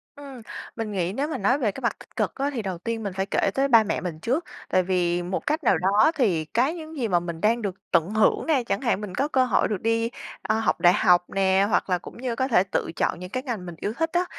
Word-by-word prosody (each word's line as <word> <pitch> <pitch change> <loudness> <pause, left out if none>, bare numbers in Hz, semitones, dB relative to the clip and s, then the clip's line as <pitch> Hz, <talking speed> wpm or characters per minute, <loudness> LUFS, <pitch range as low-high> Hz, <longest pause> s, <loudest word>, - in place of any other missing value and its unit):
Ừm, 275 -4 -10 0.3
mình 225 -2 -4
nghĩ 185 -2 -1
nếu 280 +6 -1
mà 315 - -3
nói 225 +7 +2
về 235 -8 0
cái 270 - -9
mặt 235 - -1
tích - - -17
cực - - -1
á, 280 +1 -1
thì 240 - -2
đầu 190 -4 -4
tiên 225 +5 -4
mình 200 -2 -3
phải 190 +1 -1
kể 195 - 0
tới 270 +1 +2
ba 230 -4 +6
mẹ 215 - -2
mình 170 -4 -5
trước. 260 - -1 0.3
Tại 185 - +3
vì 175 -1 0
một 180 +2 -3
cách 310 +2 0
nào 230 - +4
đó 200 - +4
thì 185 - +1
cái 245 - +1
những 320 -1 -9
gì 245 -4 0
mà 180 -4 +2
mình 170 -1 -6
đang 230 +3 +2
được 200 -4 -3 0.2
tận 170 0 +3
hưởng 215 0 +2
nè, 290 -6 +2
chẳng 215 -3 -2
hạn 235 -5 0
mình 195 -3 -6
có 275 +3 +1
cơ 260 -4 +2
hội - - +2
được 205 -4 -3
đi, 230 +1 +1 0.3
a, 215 - 0
học 225 - 0
đại 175 0 +6
học 180 -4 +4
nè, 195 0 +2
hoặc 195 - +1
là 180 - +2
cũng 175 - -12
như 245 -1 -3
có 260 +2 0
thể 215 -8 +4
tự - - -1
chọn - - 0
những 180 0 -7
cái 255 +6 -3
ngành 230 -9 -4
mình 175 -1 -7
yêu 210 - -2
thích 325 0 0
á, 355 +1 +2
215 Hz, 285 wpm, -25 LUFS, 185-255 Hz, 0.3 s, ba